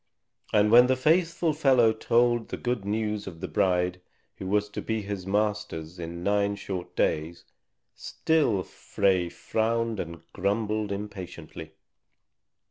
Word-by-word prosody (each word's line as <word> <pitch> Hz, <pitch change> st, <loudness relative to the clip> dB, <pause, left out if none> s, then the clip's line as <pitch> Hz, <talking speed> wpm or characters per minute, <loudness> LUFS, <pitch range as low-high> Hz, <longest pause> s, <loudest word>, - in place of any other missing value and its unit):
And 105 Hz, 0 st, +4 dB
when 120 Hz, +2 st, +8 dB
the 130 Hz, -, +3 dB
faithful 165 Hz, +3 st, +2 dB
fellow 130 Hz, -7 st, +4 dB
told 120 Hz, +1 st, +2 dB
the -, -, -4 dB
good 120 Hz, -5 st, -2 dB
news 105 Hz, 0 st, -2 dB
of 85 Hz, -4 st, -8 dB
the 95 Hz, -, -4 dB
bride 90 Hz, +2 st, +1 dB, 0.4 s
who 95 Hz, -, -6 dB
was 105 Hz, +2 st, +1 dB
to -, -, -5 dB
be 110 Hz, -2 st, -2 dB
his 100 Hz, -2 st, -5 dB
master's 100 Hz, -5 st, -2 dB
in 85 Hz, +1 st, -6 dB
nine 100 Hz, 0 st, +1 dB
short 95 Hz, -3 st, -6 dB
days, 80 Hz, +2 st, -1 dB, 0.5 s
still 145 Hz, -12 st, 0 dB
Frey 95 Hz, -3 st, 0 dB
frowned 115 Hz, +2 st, -1 dB
and 85 Hz, -1 st, -6 dB
grumbled 105 Hz, +2 st, -1 dB
impatiently. 90 Hz, -6 st, -7 dB
105 Hz, 130 wpm, -27 LUFS, 90-115 Hz, 0.5 s, when